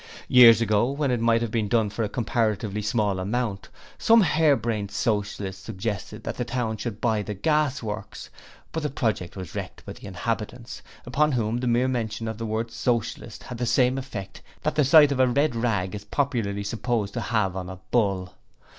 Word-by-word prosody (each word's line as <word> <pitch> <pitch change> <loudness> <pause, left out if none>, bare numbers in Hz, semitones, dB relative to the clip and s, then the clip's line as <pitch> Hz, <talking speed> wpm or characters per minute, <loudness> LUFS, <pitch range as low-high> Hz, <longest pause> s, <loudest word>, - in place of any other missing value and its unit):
Years 115 -3 +8
ago, 110 +2 +2
when 140 -1 -1
it 120 - +1
might 115 0 +3
have 115 - -3
been 110 -2 0
done 110 -1 +1
for 105 - -4
a 105 - 0
comparatively 110 -3 -1
small 105 -3 0
amount, 105 0 -2 0.3
some 230 0 +6
hare 155 -4 +4
brained 110 -5 -2
Socialists 105 -3 -2
suggested 105 -1 -5
that - - -4
the - - -1
town 120 -2 -2
should 110 -2 -5
buy 110 -3 +1
the 105 0 -5
Gas 150 +2 +1
Works, 105 -1 -6 0.4
but 160 - -3
the 150 - -1
project 110 -9 -2
was 95 -2 -7
wrecked - - -7
by - - -6
the - - -11
inhabitants, 115 +4 -4 0.2
upon 145 +4 +1
whom 115 -1 0
the 125 - -2
mere 120 +2 +2
mention 115 -3 -2
of 110 0 -5
the 115 - -3
word 110 +1 -2
Socialist 120 -1 -2
had 120 - -8
the 120 - -1
same 130 +2 +3
effect 105 -7 -7 0.2
that - - 0
the 150 - +3
sight 145 +1 +7
of 135 - -1
a 130 - +5
red 140 +1 +1
rag 105 -6 0
is 105 -1 -6
popularly 110 -6 -1
supposed 110 -1 -2
to - - -3
have 105 -5 0
on 95 -1 -5
a 95 - -7
bull. 95 -5 +1
115 Hz, 200 wpm, -25 LUFS, 105-125 Hz, 0.4 s, Years